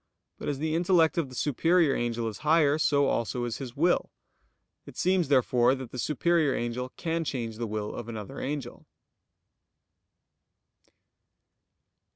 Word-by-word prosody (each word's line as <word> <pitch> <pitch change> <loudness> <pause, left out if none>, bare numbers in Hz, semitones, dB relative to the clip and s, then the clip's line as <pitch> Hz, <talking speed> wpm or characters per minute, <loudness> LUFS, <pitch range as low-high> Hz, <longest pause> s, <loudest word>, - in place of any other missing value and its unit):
But - - -4
as 145 - -2
the 155 +2 -2
intellect 170 -2 +3
of 145 -5 -2
the 130 - -11
superior 160 +3 +2
angel 120 -1 -1
is 110 - -6
higher, 150 -1 +3
so 145 -2 +3
also 120 -1 -1
is 120 -1 -3
his 130 -4 -7
will. 175 +4 +2 0.8
It - - -12
seems, 185 -3 +2
therefore, 125 -2 +3
that 130 -3 -8
the 125 - -6
superior 155 +1 +1
angel 120 +2 -3
can 165 0 -1
change 115 -7 -4
the 115 0 -3
will 105 0 -4
of 120 - -7
another 110 +4 -7
angel. 145 0 -5
135 Hz, 145 wpm, -28 LUFS, 120-160 Hz, 0.8 s, intellect